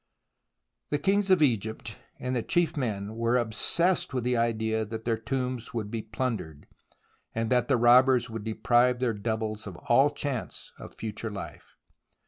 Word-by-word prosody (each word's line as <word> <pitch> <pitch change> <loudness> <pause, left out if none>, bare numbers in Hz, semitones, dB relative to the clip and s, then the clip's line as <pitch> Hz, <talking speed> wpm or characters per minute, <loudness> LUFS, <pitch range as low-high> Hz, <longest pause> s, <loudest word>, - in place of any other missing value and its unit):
The 145 - +1
kings 195 +5 +1
of 185 -4 +5
Egypt 110 -3 -1 0.2
and 125 0 -3
the 120 - +1
chief 170 +5 +1
men 110 -7 -3
were 115 +2 +1
obsessed 130 +8 +1
with 125 - -1
the 125 0 +1
idea 110 -1 0
that 110 +1 -7
their 115 -1 +1
tombs 125 0 -3
would 105 -3 -3
be 115 - -2
plundered, 110 - -4 0.7
and 115 +1 -1
that 125 -1 +3
the 135 - +3
robbers 125 +1 +5
would 115 -2 -6
deprive 120 +3 +2
their 125 -3 +1
doubles 110 0 -3
of 90 -3 -8
all 135 +9 +3
chance 140 -4 -5
of - - -11
future 110 +1 -5
life. 90 -7 -9
115 Hz, 160 wpm, -28 LUFS, 110-130 Hz, 0.7 s, of